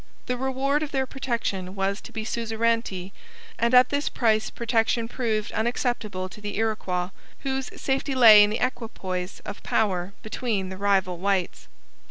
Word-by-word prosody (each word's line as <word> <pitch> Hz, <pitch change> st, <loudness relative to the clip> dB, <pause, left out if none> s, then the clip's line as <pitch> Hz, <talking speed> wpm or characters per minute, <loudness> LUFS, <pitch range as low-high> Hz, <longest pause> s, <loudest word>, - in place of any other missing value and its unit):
The 250 Hz, -, -1 dB
reward 265 Hz, +3 st, 0 dB
of 305 Hz, -, -2 dB
their 265 Hz, -1 st, 0 dB
protection 230 Hz, -8 st, -3 dB
was 195 Hz, +1 st, -1 dB
to -, -, -11 dB
be 220 Hz, -1 st, -5 dB
suzerainty, 225 Hz, -5 st, -1 dB, 0.5 s
and 235 Hz, -, +2 dB
at 250 Hz, 0 st, +7 dB
this 285 Hz, +1 st, 0 dB
price 220 Hz, -3 st, +1 dB
protection 230 Hz, 0 st, 0 dB
proved 225 Hz, -4 st, -2 dB
unacceptable 220 Hz, -4 st, -1 dB
to 210 Hz, -, -12 dB
the 205 Hz, -1 st, -4 dB
Iroquois, 195 Hz, -5 st, -1 dB, 0.3 s
whose 265 Hz, -1 st, -2 dB
safety 270 Hz, 0 st, -1 dB
lay 220 Hz, -5 st, +9 dB
in 205 Hz, -, +3 dB
the 215 Hz, -, -1 dB
equipoise 190 Hz, -7 st, -5 dB
of 205 Hz, -, -8 dB
power 190 Hz, -3 st, 0 dB
between 215 Hz, -4 st, -2 dB
the 190 Hz, -, -7 dB
rival 190 Hz, -3 st, +1 dB
whites. 190 Hz, -1 st, -1 dB
220 Hz, 155 wpm, -25 LUFS, 195-245 Hz, 0.5 s, lay